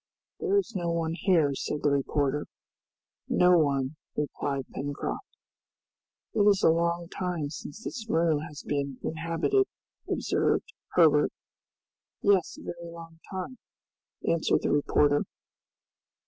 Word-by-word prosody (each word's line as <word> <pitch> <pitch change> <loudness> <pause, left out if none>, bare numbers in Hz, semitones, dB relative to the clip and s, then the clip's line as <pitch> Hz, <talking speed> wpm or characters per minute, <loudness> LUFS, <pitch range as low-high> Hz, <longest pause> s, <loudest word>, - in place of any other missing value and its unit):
"There 405 -2 +2
is 390 -12 0
no 175 -2 -1
one 165 -1 0
here," 165 -5 +3
said 145 +2 -3
the 145 - +4
reporter. 140 +1 0 0.8
"No 180 0 +5
one," 140 -1 +1 0.2
replied 140 -2 -2
Pencroft. 145 +1 -3 1.1
"It - - -1
is 205 -1 +5
a - - +7
long 170 +1 0
time 180 -7 -2
since 155 +6 -8
this 225 -3 -5
room 165 -4 +3
has 150 0 -8
been 140 -2 -2
inhabited," 165 - +1 0.4
observed 445 - 0 0.2
Herbert. - - +5 0.9
"Yes, 195 -4 +3
a - - -11
very 170 0 -7
long 165 -1 -11
time!" 205 +6 -5 0.7
answered 165 -1 +2
the - - +1
reporter. 145 0 +3
165 Hz, 120 wpm, -28 LUFS, 145-180 Hz, 1.1 s, a